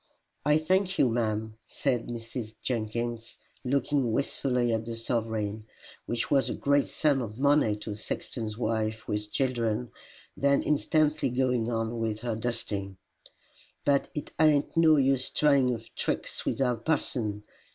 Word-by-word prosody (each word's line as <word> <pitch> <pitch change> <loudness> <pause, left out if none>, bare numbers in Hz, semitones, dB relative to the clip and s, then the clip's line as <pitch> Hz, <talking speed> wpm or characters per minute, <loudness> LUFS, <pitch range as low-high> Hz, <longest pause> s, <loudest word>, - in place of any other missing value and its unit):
"I 150 +1 +4
thank 185 +4 +1
you, 130 - +4
ma'am," 110 -1 -1
said 125 +1 -1
Mrs. 115 -1 -6
Jenkins, 115 0 -3 0.3
looking 135 -1 +1
wistfully 125 -1 0
at 110 0 0
the 115 0 -4
sovereign, 110 -2 -2 0.4
which 120 -1 -2
was 135 -2 +3
a - - -2
great 140 0 +2
sum 145 -4 +2
of 110 -2 -6
money 140 -5 +3
to 105 +1 -7
a - - -4
sexton's 110 +1 -4
wife 110 -1 -1
with 105 0 -2
children, 120 -3 0 0.4
then 140 0 +2
instantly 150 -1 +2
going 125 -2 +1
on 115 0 -2
with 110 -1 -2
her 120 -2 -2
dusting; 105 -4 -3 0.9
"but 140 -1 +3
it 150 - -5
ain't 155 -2 +3
no 160 -2 +6
use 135 -1 +3
tryin' 140 -4 +3
of 115 -1 -6
tricks - - -2
with - - 0
our 125 -2 +2
parson. 115 -6 -1
120 Hz, 145 wpm, -28 LUFS, 110-140 Hz, 0.9 s, no